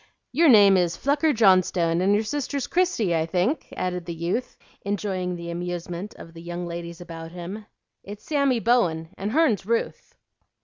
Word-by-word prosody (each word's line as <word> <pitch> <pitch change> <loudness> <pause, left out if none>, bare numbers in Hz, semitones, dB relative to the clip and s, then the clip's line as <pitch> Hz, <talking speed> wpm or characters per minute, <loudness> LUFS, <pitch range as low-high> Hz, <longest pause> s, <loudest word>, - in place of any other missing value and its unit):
"Your 320 +4 +4
name 200 -5 +7
is 175 -2 0
Flucker 290 +3 +2
Johnstone, 185 - +3
and 195 +2 +3
your 210 - +1
sister's 280 +2 -3
Christie, 345 - +1
I 160 0 0
think?" 185 - -1
added 180 -2 -3
the 170 - -4
youth, 175 +9 -3 0.2
enjoying 190 -3 -2
the 170 0 -6
amusement 175 +2 -5
of 165 - -12
the 165 - -11
young 175 +1 -5
ladies 170 0 -7
about 165 -1 -8
him. 190 +5 -7 0.4
"It's 205 +1 -10
Sammy 280 -5 +1
Bowen, 175 -9 +1
and 200 +2 -4
hern's 265 - +2
Ruth." 230 +4 -3
185 Hz, 165 wpm, -24 LUFS, 170-230 Hz, 0.4 s, name